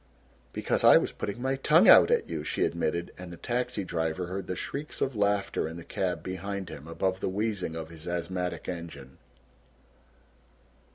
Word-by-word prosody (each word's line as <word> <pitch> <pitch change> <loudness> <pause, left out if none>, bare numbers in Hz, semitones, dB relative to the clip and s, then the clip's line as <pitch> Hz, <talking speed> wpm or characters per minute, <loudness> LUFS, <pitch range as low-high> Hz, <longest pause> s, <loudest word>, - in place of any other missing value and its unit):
"Because - - 0
I - - +9
was - - 0
putting 105 +4 -5
my 135 +1 0
tongue 135 - +5
out - - +9
at - - +2
you," 80 -3 -4
she - - 0
admitted, 85 0 -1
and 90 -1 -8
the 85 - -9
taxi 120 -2 -2
driver 80 0 -2
heard 95 +1 -5
the 90 - -2
shrieks 145 - -5
of 130 -2 -1
laughter 100 -5 +1
in 80 +1 -7
the 85 - -8
cab 90 0 -2
behind 95 0 -4
him 70 +2 -9
above 95 +3 -1
the - - -1
wheezing 100 -4 -2
of 80 -1 -6
his 80 0 -9
asthmatic 90 +1 -3
engine. 80 -7 -7
90 Hz, 175 wpm, -28 LUFS, 85-100 Hz, -, I